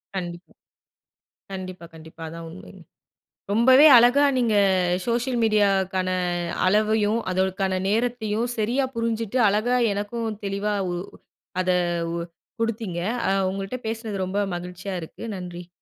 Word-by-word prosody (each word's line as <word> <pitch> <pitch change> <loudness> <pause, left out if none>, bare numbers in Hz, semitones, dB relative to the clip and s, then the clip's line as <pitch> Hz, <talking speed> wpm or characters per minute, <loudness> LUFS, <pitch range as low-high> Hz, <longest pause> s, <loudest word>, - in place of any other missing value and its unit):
கண்டிப்பா. 175 -1 -6 1.0
கண்டிப்பா, 185 -2 -7
கண்டிப்பா. 160 +1 -12
அதான் 165 +1 -8
உண்மங்க. 185 +1 -12 0.7
ரொம்பவே 260 +7 +6
அழகா 245 +5 +5
நீங்க 230 -4 +2 0.5
சோஷியல் 240 +1 0
மீடியாக்கான 195 -3 +2 0.6
அளவையும் 215 +2 +2
அதற்கான 190 0 0
நேரத்தையும் 230 0 0
சரியா 240 +5 +1
புரிஞ்சிட்டு 230 0 -1
அழகா 215 +5 +1 0.2
எனக்கும் 225 +3 -3 0.2
தெளிவா 200 +1 -1 0.2
உ - - -2 0.7
அத 185 - -2 0.4
உ - - -2 0.4
குடுத்தீங்க. 220 -6 -2 0.3
அ - - +2 0.2
உங்கள்ட்ட 195 +5 -4
பேசினது 220 -4 -3
ரொம்ப 195 +2 -2 0.2
மகிழ்ச்சியா 180 +2 -6
இருக்கு. 160 - -10
நன்றி 175 -1 -8
205 Hz, 110 wpm, -24 LUFS, 185-230 Hz, 1.0 s, ரொம்பவே